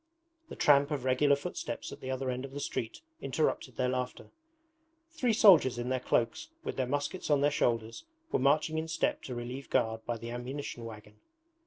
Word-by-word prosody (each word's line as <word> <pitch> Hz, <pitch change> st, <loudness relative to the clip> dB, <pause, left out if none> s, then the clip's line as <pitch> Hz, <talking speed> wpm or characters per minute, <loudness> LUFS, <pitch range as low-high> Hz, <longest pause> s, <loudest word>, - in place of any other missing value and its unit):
The -, -, -7 dB
tramp 140 Hz, -1 st, +5 dB
of 145 Hz, -5 st, -2 dB
regular 140 Hz, +3 st, +4 dB
footsteps 140 Hz, -5 st, -5 dB
at 140 Hz, -, -9 dB
the 130 Hz, -, -6 dB
other 130 Hz, 0 st, -1 dB
end 125 Hz, +1 st, -4 dB
of 135 Hz, 0 st, -8 dB
the 145 Hz, -, -4 dB
street 115 Hz, -5 st, -4 dB, 0.2 s
interrupted 135 Hz, -3 st, -1 dB
their 125 Hz, -, +1 dB
laughter. 125 Hz, 0 st, -4 dB, 0.8 s
Three 265 Hz, -8 st, +1 dB
soldiers 180 Hz, -, +6 dB
in 120 Hz, +1 st, -3 dB
their 130 Hz, 0 st, +1 dB
cloaks, 115 Hz, -, 0 dB
with -, -, -4 dB
their 130 Hz, -2 st, -1 dB
muskets 145 Hz, +7 st, -2 dB
on 145 Hz, -2 st, +4 dB
their 145 Hz, +1 st, +3 dB
shoulders, 115 Hz, -, 0 dB, 0.3 s
were -, -, +2 dB
marching 155 Hz, +4 st, +2 dB
in 160 Hz, -, -4 dB
step 165 Hz, -, 0 dB
to 125 Hz, -, -5 dB
relieve 125 Hz, +3 st, -6 dB
guard 110 Hz, 0 st, +1 dB
by 120 Hz, -1 st, -1 dB
the 115 Hz, +1 st, -7 dB
ammunition 120 Hz, 0 st, -5 dB
wagon. 105 Hz, -1 st, -10 dB
130 Hz, 190 wpm, -31 LUFS, 120-145 Hz, 0.8 s, soldiers